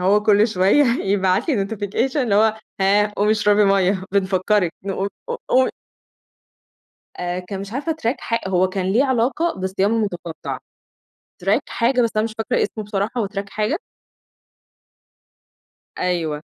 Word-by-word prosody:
هو 200 +3 +3
كل 210 +1 +4
شوية 200 +8 +4
يبعت 200 - +1
لي 210 -10 +1
notification 225 +5 -2
اللي 245 -8 +1
هو 220 +1 +4 0.2
هاه 205 +2 +3
قُومي 210 +1 +2
اشربي 210 -1 +3
مَيَّة، 195 -1 +2
بنفكرك 190 -1 +1
نقو 195 0 -2 0.2
قو - - -2
قوم 260 0 +4 1.5
آآ 180 0 -2
كان 190 +2 -6
مش 200 +1 -8
عارفة 290 +6 -1
track 240 - +1
حا 230 - -1
هو 185 0 +2
كان 185 0 -3
ليه 250 +6 +4
علاقة 260 +6 +1
بالصيام 190 +3 0
المتقطع. 175 -7 -3 0.9
track - - +3
حاجة 250 +2 +1
بس 230 - +2
أنا 215 - +2
مش 225 - -5
فاكرة 225 +2 0
اسمه 215 - -4
بصراحة 205 0 -2
هو 205 - -1
track 200 0 -5
حاجة. 215 - -1 2.2
أيوه، 165 -5 -1
205 Hz, 145 wpm, -21 LUFS, 190-225 Hz, 2.2 s, كل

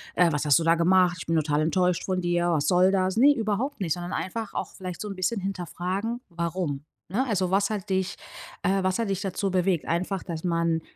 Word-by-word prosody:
äh, 175 -1 +4
was 145 -1 -1
hast 145 -2 +5
du 170 - 0
da 165 0 +5
gemacht? 180 +1 +3
Ich - - -8
bin 165 - +1
total 150 -1 +1
enttäuscht 180 +2 +1
von 185 -1 -1
dir. 175 0 +1
Was 155 -4 +1
soll 180 +3 +4
das?“ 190 0 +1
Ne, 285 +4 +6
überhaupt 225 +5 -2
nicht, 165 -5 +1
sondern 175 +1 -5
einfach 220 +3 -4
auch - - -3
vielleicht 180 -2 -7
so 210 - -4
'n 200 - -5
bisschen 190 +3 -1
hinterfragen: 190 +5 -3
„Warum?“ 170 -4 -3 0.2
Ne? 210 +10 0
Also: 190 -5 0
„Was 200 +1 +2
hat 205 -3 -4
dich, 190 -1 0 0.5
äh 195 0 +2
was 185 0 +1
hat 225 -4 -1
dich 195 -1 -2
dazu 195 0 -2
bewegt?“ 180 -2 +1
Einfach, 180 +3 -1
dass 165 -3 -6
man, 170 -2 +1
185 Hz, 225 wpm, -26 LUFS, 170-195 Hz, 0.5 s, Ne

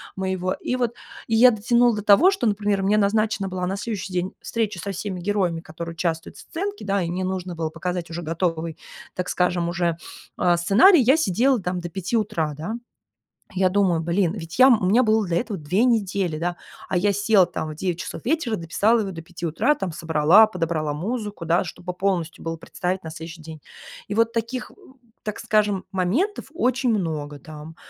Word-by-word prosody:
моего. 190 -1 -1
И 250 - -3
вот, 240 -2 -1 0.3
и 225 - -2
я 250 +3 +8
дотянула 235 +2 +3
до 210 - -4
того, 215 - +6
что, 390 -11 -2
например, 205 -1 0
мне 210 +2 +3
назначена 210 -1 +1
была 180 -1 -3
на 195 +2 -2
следующий 205 -3 -4
день 180 +1 -1
встреча 215 -6 -2
со 200 +3 -4
всеми 190 0 -4
героями, 180 -4 0
которые 165 +1 -7
участвуют 165 -1 -3
в - - -11
сценке, 400 - -5
да, 200 -1 +1
и 170 - -3
мне 185 +1 -2
нужно 185 -1 -3
было 160 -1 -2
показать 175 -1 -4
уже 170 +1 -4
готовый, 165 -1 -2 0.4
так 180 - -3
скажем, 175 -1 +1
уже, 170 -1 0 0.4
э, 175 -1 +3
сценарий. 250 - +6
Я 265 +6 +5
сидела 255 - +2
там 180 0 -2
до 175 - -5
5 190 +6 -2
утра, 160 -8 -1
да. 175 +9 -4 0.8
Я 185 0 +3
думаю: 185 -4 +2
"Блин, 170 +1 +1
ведь 165 +1 -7
я 260 - +9
м, 230 -6 +4
у - - +1
меня 230 +7 +4
было 220 -2 +2
для 170 0 +1
этого 215 -6 -4
2 180 +10 +1
недели, 195 -8 0
да, 175 +1 -2 0.3
а 180 - 0
я 205 +3 +2
села 200 -2 +4
там 155 - -5
в - - -6
9 175 +1 -3
часов - - -6
вечера, 275 -7 0
дописала 205 +8 +2
его 195 -3 -3
до 165 -1 -8
5 170 0 -6
утра, 225 - +2
там 190 - -4
собрала, 165 +5 +5
подобрала 165 -6 -2
музыку, 205 0 -4
да, 170 +3 +2
чтобы 180 +2 -7
полностью 180 -4 -2
было 165 0 -3
представить 185 +3 -3
на 160 - -6
следующий 165 +1 -9
день". 160 -1 -10 0.5
И 205 - -3
вот 230 +1 +2
таких, 230 +3 -3
э, - - -19 0.5
так 210 -1 -4
скажем, 210 -3 +1
моментов 230 - 0
очень 255 -5 +1
много 155 -8 -2
там. 155 +2 -11
185 Hz, 200 wpm, -23 LUFS, 170-215 Hz, 0.8 s, я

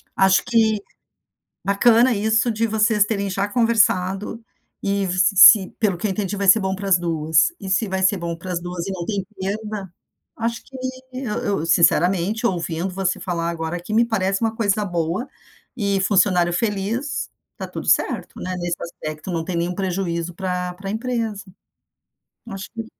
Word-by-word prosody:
Acho 190 -1 +4
que 220 -4 +2 0.8
bacana 230 +5 +4
isso 220 +3 +1
de 225 +1 0
vocês 215 -1 +3
terem 200 -2 -2
já 195 +2 -1
conversado 210 -2 +1 0.4
e 200 0 0
se 185 +2 +2
se, 205 -1 +9
pelo 210 -5 +1
que 175 - -2
eu 205 - -1
entendi, 200 +1 -2
vai 200 - -2
ser 215 +3 +7
bom 190 0 -1
para 195 +1 -5
as 180 -2 +5
2. 160 - +2
E 195 - -8
se 200 +3 +1
vai 190 0 -2
ser 190 +1 +3
bom 170 -1 -4
para 180 +2 -6
as 170 - -2
2 175 0 -5
e 195 - -3
não 180 -2 -4
tem 200 -3 -2 0.2
perda. 205 -1 -4 0.5
Acho 230 0 -2
que 265 - -12 0.4
eu 255 -5 -3
eu 195 -6 -1
sinceramente, 180 +6 +3
ouvindo 170 0 -2
você 190 -1 -1
falar 170 -2 -2
agora 165 0 -3
que 195 +5 -6
me 230 +2 +4
parece 195 -4 0
uma 225 -1 0
coisa 210 -2 +1
boa. 175 +6 -2 0.5
E 200 -3 0
funcionário 185 -3 +3
feliz, 215 - -2 0.3
tá - - -6
tudo - - -7
certo, - - +1
né. 185 - -3
Nesse 175 -1 -2
aspecto, 155 0 -7
não 165 -2 -2
tem 185 - -3
nenhum 170 +1 -1
prejuízo 175 -3 -2
para 180 0 -3
para 195 +2 -7
a - - -2
empresa. 225 -3 -3 1.0
Acho 195 -1 -7
que 225 -1 -6
195 Hz, 175 wpm, -21 LUFS, 180-215 Hz, 1.0 s, se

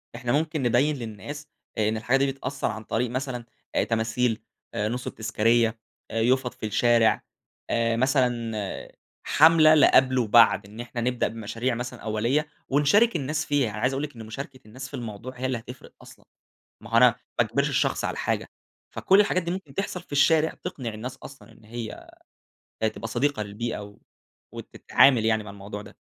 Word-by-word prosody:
إحنا 120 0 -3
ممكن 155 0 0
نبيّن 125 +5 +2
للناس 130 +5 -7 0.3
إن 110 0 +1
الحاجة 120 +4 +2
دي 135 0 +1
بتأثّر 135 +1 -4
عن 110 0 -7
طريق 115 +3 -1
مثلًا 130 -2 -4 0.3
آآ - - +3
تماثيل، 115 +1 0 0.3
نُصُب 115 +4 -3
تذكارية، 115 +1 +1 0.3
يُفَط 125 +3 +1
في - - -7
الشارع 115 +1 +3 0.5
آآ، 115 -1 +1
مثلًا 120 -5 -1 0.3
حملة 155 0 +6
لقَبل 130 -3 +5
وبعد، 115 -2 +5
إن 105 +3 -13
إحنا 120 0 -5
نبدأ 125 +1 0
بمشاريع 115 +3 -3
مثلًا 120 +1 -6
أولية، 115 +8 0 0.2
ونشارك 150 - +4
الناس 150 0 -1
فيها، 145 -5 +1
أنا 105 - -7
عايز 125 +2 +1
أقول 135 +2 -2
لِك 150 -3 -6
إن 115 -1 -9
مشاركة 130 +4 -8
الناس 130 +5 -8
في - - -22
الموضوع 115 +2 -6
هي 130 - -2
اللي 130 -1 0
هتفرق 120 +2 -11
أصلًا، - - -16 0.6
ما - - -11
هو - - +1
أنا - - +8
ما - - -2
أجبرش - - 0
الشخص - - 0
على - - -2
حاجة، - - -1 0.5
فكل 195 +2 +4
الحاجات 185 -3 +2
دي 170 - -4
ممكن 175 -7 -6
تحصل 195 0 -3
في 175 - -19
الشارع، 160 +2 +3
تقنع 130 -11 -5
الناس 120 +4 -6
أصلًا 135 -4 -13
إن 110 - -21
هي 115 0 -8 0.8
تبقى 115 - -6
صديقة 130 +1 0
للبيئة، 105 +3 -4
و 105 0 -12 0.5
وتتعامل 125 -5 +3
يعني 110 -1 +1
مع 105 - -8
الموضوع 100 +1 -8
ده. - - -14
120 Hz, 170 wpm, -25 LUFS, 110-140 Hz, 0.8 s, أنا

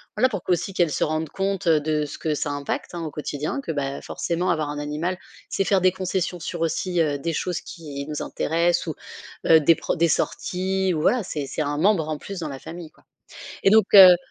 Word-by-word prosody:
Voilà 255 - +3
pour 200 -7 -4
qu'aussi 180 +2 -1
qu'elles 175 -4 +2
se 130 - 0
rendent 155 0 -1
compte, 195 -1 -2
heu, 160 -2 +5
de 150 0 0
ce 145 - -8
que 155 -2 -1
ça 145 - -2
impacte, 145 +4 -4
hein, 170 - -4
au - - -3
quotidien 150 - -4
que, 220 - -4
ben 140 -2 -3
forcément 175 +1 -1
avoir 155 -2 -1
un 145 - -4
animal, 150 +5 -2 0.3
c'est - - 0
faire 195 -1 +3
des 185 0 +4
concessions 185 -1 -2
sur, 165 +1 -5
aussi, 170 +2 0
heu, 145 -3 +1
des 165 +3 -2
choses 180 +2 -2
qui 145 -5 -8
nous 150 -1 -4
intéressent 170 +2 0
ou, 160 - -3 0.5
heu, 160 - +8
des 155 +2 +5
pro - - -2
des 170 0 +2
sorties 190 +3 0
ou, 155 - -1
voilà, 245 +7 +2
c'est 150 -6 -4
c'est 155 - -2
un 145 0 -2
membre 175 -3 +2
en 155 - -2
plus 195 -2 -7
dans 160 -3 -4
la 135 -1 -7
famille 165 +1 -9
quoi - - -27 0.6
et - - +6
donc 215 0 +6
heu, 185 -2 +11
165 Hz, 230 wpm, -24 LUFS, 150-185 Hz, 0.6 s, heu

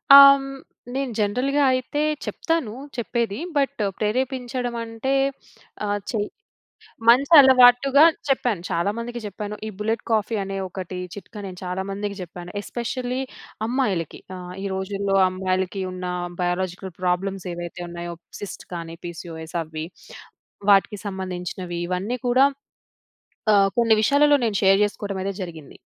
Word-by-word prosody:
ఆహ్! 280 - +13
హ్మ్, 270 0 -6 0.5
నేను 270 -2 -1
జనరల్‌గా 250 +8 +1
అయితే 255 +3 -1 0.2
చెప్తాను 325 -10 -1 0.2
చెప్పేది, 235 -2 -1 0.2
బట్ 280 -3 0 0.2
ప్రేరేపించడం 250 +2 -1
అంటే 225 +4 -2 0.7
ఆహ్, 205 0 0
చే 225 - -1 0.9
మంచి 265 +6 +6
అలవాటుగా 265 +2 +7 0.2
చెప్పాను. 245 -8 +1
చాలా 170 +4 +1
మందికి 240 +1 -5
చెప్పాను. 210 +1 -5
ఈ - - -3
బుల్లెట్ 220 +1 -1
కాఫీ 220 +1 +1
అనే 195 0 -4
ఒకటి 185 0 -6 0.2
చిట్కా 210 +2 -10
నేను 185 -1 -8
చాలా 180 +1 -2
మందికి 200 0 -4
చెప్పాను. 175 0 -9
ఎస్పెషల్లీ 250 +3 -3 0.5
అమ్మాయిలకి 220 - -1 0.2
ఆహ్, 180 0 -8
ఈ - - -1
రోజుల్లో 195 +1 -1
అమ్మాయిలకి 185 +1 -1
ఉన్న 180 0 -5 0.4
బయాలజికల్ 185 +1 -2
ప్రాబ్లమ్స్ 185 +1 -1
ఏవైతే 175 +1 -6
ఉన్నాయో, 170 0 -6 0.3
సిస్ట్స్ 205 -3 -8
కానీ 165 -1 -6
పిసిఒఎస్ 165 -1 -7
అవి 155 0 -6 0.9
వాటికి 200 +1 +4
సంబంధించినవి 180 -2 -4
ఇవన్నీ 195 +7 -2
కూడా 255 +3 +5 1.1
ఆహ్, 195 -1 +5
కొన్ని 230 -2 +5
విషయాలలో 290 +5 +5
నేను 215 -3 0
షేర్ 195 0 +6
చేసుకోవడం 200 -1 -3
అయితే 195 +1 -2
జరిగింది. 160 -5 -9
205 Hz, 125 wpm, -23 LUFS, 180-245 Hz, 1.1 s, ఆహ్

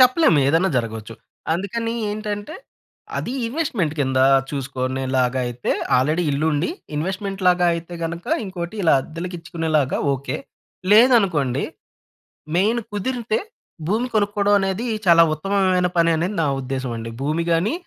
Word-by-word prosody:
చెప్పలేం 255 - +5
ఏదన్నా 165 +7 +3
జరగొచ్చు. 115 -2 -3 0.4
అందుకని 230 +6 -2 0.2
ఏంటంటే, 210 +6 -4 0.6
అది 240 - -3
ఇన్వెస్ట్‌మెంట్ 230 - -1
కింద 130 -1 +1 0.3
చూసుకునేలాగయితే 130 -2 -1 0.3
ఆల్రెడీ 155 +7 +2
ఇల్లుండి 150 +2 0 0.3
ఇన్వెస్ట్‌మెంట్‌లాగా 185 +1 +1
అయితే 170 +1 -6
గనక 170 +1 -5 0.2
ఇంకోటి, 185 0 -5
ఇలా 165 - +4
అద్దెలకిచ్చుకునేలాగా 165 -3 -2
ఓకె. 135 +1 -3 0.6
లేదనుకోండి 195 - +4 0.9
మెయిన్ 220 +6 +2
కుదిరితే 225 +1 -1 0.5
భూమి 225 +6 +1
కొనుక్కోడం 205 -1 +2
అనేది 195 +4 -1 0.2
చాలా 170 -1 +7
ఉత్తమమైన 185 +2 +1
పననేది 170 +3 +2
నా - - +2 0.2
ఉద్దేశంమండి. 125 -3 -4
భూమి 155 +4 0
గాని, 170 - +2
170 Hz, 105 wpm, -22 LUFS, 140-205 Hz, 0.9 s, చాలా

